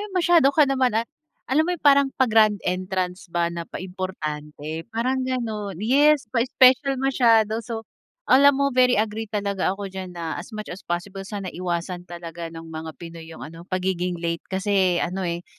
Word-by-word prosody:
'yung 380 - -6
masyado 335 -6 +5
ka 295 +1 +5
naman 260 -4 +1
a 225 - +1 0.4
alam 310 +5 +1
mo 360 - 0
'yung 305 - -28
parang 280 -1 +6
pa-grand 220 -4 +4
entrance 185 +1 -2
ba 170 0 0
na 170 -1 -6
pa-importante, 160 -3 -6
parang 250 +3 -1
gano'n. 220 -7 -3
Yes, 280 - +4
pa-special 260 +3 +4
masyado 230 -5 +3
so 225 0 -6 0.4
alam 280 - +6
mo, 280 0 +1
very 250 0 +4
agree 215 +1 -1
talaga 200 -3 -1
ako 205 - -6
diyan 185 -2 -7
na, 165 0 -4
as 175 - -10
much 215 - -6
as 185 - -9
possible 185 +3 -4
sana 200 -3 -5
iwasan 175 0 -4
talaga 170 -1 -7
ng 165 0 -9
mga 160 0 -7
Pinoy 165 -1 -10
'yong 165 - -9
ano, 165 +3 -11
pagiging 180 -1 -1
late, 170 -1 -2
kasi 190 -2 +1
ano, 180 +2 -2
eh, 170 +1 -4
195 Hz, 175 wpm, -23 LUFS, 175-250 Hz, 0.4 s, parang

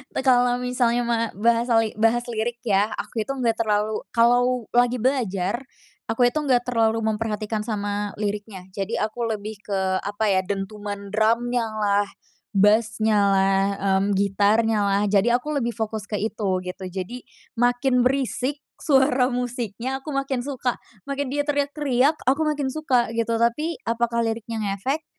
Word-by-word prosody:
Eee, 265 - -2
kalo 245 -1 +4
misalnya 245 -1 0
mah 230 -1 0
bahasali 230 0 +2
bahas 225 +2 +2
lirik 230 +2 -2
ya 205 0 +2
aku 225 - -3
itu 245 - -6
nggak 250 -4 +1
terlalu 215 0 0
kalo 245 0 +3
lagi 245 +1 +3
belajar, 230 -4 0 0.5
aku 245 +2 +3
itu 300 +5 +1
nggak 255 -4 +2
terlalu 225 -2 +2
memperhatikan 215 0 -2
sama 205 -1 -2
liriknya. 205 -2 -4
Jadi 200 +3 -3
aku 225 +2 -2
lebih 210 -1 -5
ke 190 -2 -1
apa 205 +2 -2
ya, 190 - +3
dentuman 200 +1 -5
drumnyalah, 220 -2 +1 0.5
bass-nyalah, 200 -2 +3 0.2
mmm, 200 -1 +1
gitarnyalah 205 0 +2
jadi 210 +4 +3
aku 300 +4 -5
lebih 235 0 -3
fokus 220 -1 -4
ke 210 - -1
itu 215 -1 -2 0.2
gitu. 180 +1 -6
Jadi 195 +7 -6 0.3
makin 245 +2 +2
berisik 265 +2 0 0.2
suara 265 -3 +3
musiknya 245 +1 -3
aku 305 - -8
makin 275 -3 -1
suka, 255 -2 -2 0.3
makin 280 -1 -3
dia 290 +1 -1
teriak-teriak 285 -1 +1
aku 275 +5 +2
makin 280 -3 -2
suka 255 -7 +1
gitu, 230 0 0
tapi 290 +8 0
apakah 235 0 0
liriknya 225 0 -3 0.2
ngefek? 270 +11 -2
230 Hz, 140 wpm, -23 LUFS, 210-250 Hz, 0.5 s, kalo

